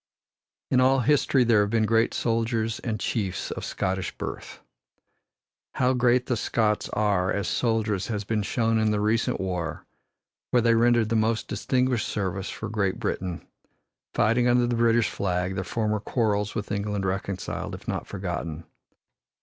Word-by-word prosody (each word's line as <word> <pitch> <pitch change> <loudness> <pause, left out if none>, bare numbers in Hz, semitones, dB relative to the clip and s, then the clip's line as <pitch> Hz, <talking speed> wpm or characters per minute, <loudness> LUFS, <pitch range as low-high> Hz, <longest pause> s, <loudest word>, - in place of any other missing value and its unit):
In 130 - +4
all 130 +1 +4
history 135 0 +3
there 115 -3 +4
have 105 - +1
been 110 0 +2
great 115 +1 +2
soldiers 115 -1 0
and 110 -3 -3
chiefs 100 -7 -2
of - - -5
Scottish 95 -1 -2
birth. - - -6 1.2
How 130 0 +2
great 125 0 +3
the 125 - 0
Scots 110 -1 0
are 100 -3 +1
as 100 -3 -1
soldiers 110 -2 0
has 105 -3 -2
been 110 +1 -1
shown 115 +2 +1
in 110 0 +2
the 105 -1 +1
recent 110 +2 +1
war, 90 -3 -3 0.6
where 120 - +3
they 115 -1 +4
rendered 115 -1 +3
the 115 - +1
most 110 +1 +1
distinguished 125 -2 0
service 95 -1 -3
for 110 - -5
Great 105 -1 -1
Britain, 95 -5 -3 0.7
fighting 115 +3 +3
under 120 0 +4
the 120 0 0
British 115 -1 +3
flag, 90 -1 -1
their 95 0 -2
former 105 +1 -1
quarrels 105 -2 0
with 105 -2 -4
England 100 -1 -2
reconciled, 95 0 -3
if - - -13
not - - -3
forgotten. 85 -4 -4
110 Hz, 155 wpm, -26 LUFS, 100-115 Hz, 1.2 s, In